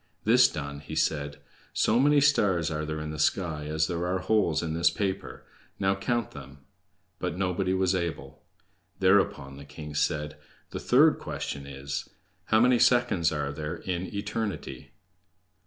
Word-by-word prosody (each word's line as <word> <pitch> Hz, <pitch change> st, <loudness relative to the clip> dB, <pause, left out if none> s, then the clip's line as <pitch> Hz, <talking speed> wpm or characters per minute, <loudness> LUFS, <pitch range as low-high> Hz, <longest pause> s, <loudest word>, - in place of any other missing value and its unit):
This 120 Hz, +3 st, +6 dB
done, 70 Hz, -2 st, -6 dB
he 75 Hz, +2 st, -8 dB
said: 75 Hz, -2 st, -1 dB, 0.4 s
"So 115 Hz, +3 st, +2 dB
many 145 Hz, +2 st, +4 dB
stars 95 Hz, -, +2 dB
are 75 Hz, 0 st, -2 dB
there 75 Hz, 0 st, -4 dB
in 75 Hz, 0 st, -5 dB
the 75 Hz, -, -6 dB
sky 75 Hz, -1 st, 0 dB
as 80 Hz, +1 st, +1 dB
there 85 Hz, +1 st, -3 dB
are 90 Hz, +1 st, 0 dB
holes 90 Hz, -5 st, +1 dB
in 80 Hz, -1 st, -3 dB
this 85 Hz, +1 st, +3 dB
paper; 95 Hz, +2 st, -4 dB, 0.3 s
now 95 Hz, 0 st, +2 dB
count 115 Hz, +3 st, -2 dB
them." 70 Hz, 0 st, -11 dB, 0.6 s
But 90 Hz, -1 st, -3 dB
nobody 95 Hz, 0 st, 0 dB
was 95 Hz, 0 st, +2 dB
able. 85 Hz, -3 st, -4 dB, 0.6 s
Thereupon 95 Hz, -8 st, +2 dB
the 70 Hz, -, -10 dB
king 75 Hz, +1 st, -9 dB
said: 75 Hz, 0 st, -1 dB, 0.3 s
"The -, -, -4 dB
third -, -, +4 dB
question 70 Hz, -1 st, -5 dB
is: 70 Hz, 0 st, -5 dB, 0.4 s
How 110 Hz, +1 st, +3 dB
many 125 Hz, +1 st, +4 dB
seconds 120 Hz, -11 st, +3 dB
are 70 Hz, -2 st, -2 dB
there 75 Hz, +1 st, -5 dB
in 90 Hz, 0 st, -4 dB
eternity?" 105 Hz, -4 st, -5 dB
85 Hz, 155 wpm, -27 LUFS, 75-100 Hz, 0.6 s, This